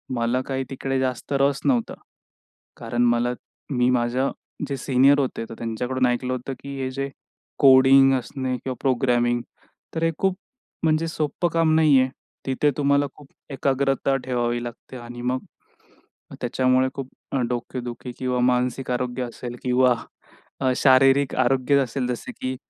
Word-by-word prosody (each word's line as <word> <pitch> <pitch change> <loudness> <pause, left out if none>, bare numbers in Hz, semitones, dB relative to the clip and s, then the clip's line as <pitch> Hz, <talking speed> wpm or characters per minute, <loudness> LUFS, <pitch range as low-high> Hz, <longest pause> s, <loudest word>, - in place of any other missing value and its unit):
मला 120 +2 0
काही 135 -1 -2
तिकडे 135 0 -2
जास्त 130 +1 -2
रस 140 0 +2
नव्हता. 125 -5 +1 0.8
कारण 120 +1 -1
मला 120 +1 +2 0.4
मी 125 -1 +2
माझ्या 125 +2 +1 0.4
जे 140 -1 -3
सीनियर 135 +2 +4
होते 125 -4 -2
तर - - -7
त्यांच्याकडून 125 +3 -1
ऐकलं 125 +1 -1
होतं, 130 +2 -4
की 140 0 -8
हे 130 - -2
जे 135 +1 -3 0.5
कोडिंग 135 0 +7
असणे 130 +1 -4
किंवा 130 +1 -5
प्रोग्रॅमिंग 120 -2 +1 0.5
तर 160 - -1
हे 165 - +3
खूप 190 -1 0 0.5
म्हणजे 160 +1 +2
सोप्पं 160 +2 -1
काम 165 -1 +3
नाही 150 -4 +5
आहे. 130 0 +2 0.4
तिथे 140 +2 +1
तुम्हाला 140 0 +3
खूप 145 - -15 0.2
एकाग्रता 135 0 +1
ठेवावी 120 -2 -1
लागते 120 +2 -9
आणि 120 0 -9
मग 125 +1 -1 1.0
त्याच्यामुळे 130 +1 +2
खूप 135 -1 -6 0.2
अ, 135 - 0
डोकेदुखी 125 0 -5
किंवा 125 -1 -1
मानसिक 125 +1 +1
आरोग्य 125 0 -2
असेल 120 0 -7
किंवा 125 0 +3 0.8
शारीरिक 135 +1 +4
आरोग्य 130 +2 +2
असेल 130 0 -1
जसं 125 - -4
की 130 0 -2
130 Hz, 145 wpm, -23 LUFS, 125-135 Hz, 1.0 s, कोडिंग